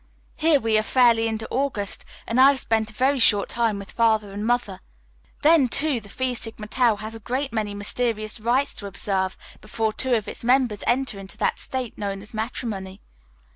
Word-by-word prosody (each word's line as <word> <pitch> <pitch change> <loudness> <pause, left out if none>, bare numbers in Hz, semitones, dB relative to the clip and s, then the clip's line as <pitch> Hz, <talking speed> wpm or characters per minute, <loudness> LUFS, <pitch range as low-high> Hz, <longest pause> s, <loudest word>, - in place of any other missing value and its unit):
Here 310 -2 +4
we 220 -3 +2
are - - +1
fairly 230 -1 +3
into 220 0 -3
August 255 -7 -2 0.2
and 235 +3 +2
I 270 - +9
have 280 -1 +1
spent 220 -3 0
a - - -12
very 265 +4 +1
short 205 -3 +4
time 230 -3 0
with 200 0 -9
Father 220 -3 +2
and 205 +1 -5
Mother. 240 -6 0 0.6
Then, 305 -3 +5
too, 275 0 +2
the 200 - -13
Phi 260 +4 -2
Sigma 225 -2 -4
Tau 235 0 +2
has 215 +2 -7
a 225 - -8
great 255 +5 -3
many 210 -2 -2
mysterious 215 +1 -1
rites 245 +5 +1
to 205 - -6
observe 190 -1 -2 0.2
before 215 +1 -2
two 255 +1 +1
of 215 -3 -2
its - - -4
members 245 -4 +2
enter 245 -4 +1
into 195 0 -8
that - - 0
state 255 -3 -4
known 200 -1 -4
as 210 - -10
matrimony. 215 -4 -5
225 Hz, 195 wpm, -24 LUFS, 210-255 Hz, 0.6 s, I